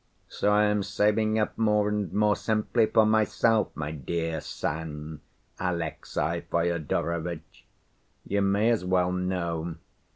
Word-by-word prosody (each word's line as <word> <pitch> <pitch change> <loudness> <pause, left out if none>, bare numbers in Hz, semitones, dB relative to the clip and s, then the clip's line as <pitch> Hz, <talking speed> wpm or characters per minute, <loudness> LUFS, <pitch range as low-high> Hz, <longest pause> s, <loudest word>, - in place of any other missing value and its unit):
So 105 - 0
I 105 0 +4
am 105 0 +2
saving 110 +2 +1
up 110 +1 -1
more 105 -2 +3
and 105 -4 -1
more, 105 0 +3
simply 110 +1 +1
for 110 -1 +4
myself, 110 0 +3
my 75 -1 -4
dear 80 +2 -3
son 75 0 -5 0.4
Alexey 85 -1 -2
Fyodorovitch. 85 0 -2 0.6
You 100 0 0
may 100 +4 +3
as 115 -5 +1
well 90 -1 +2
know. 85 -3 -2
90 Hz, 125 wpm, -27 LUFS, 80-105 Hz, 0.6 s, I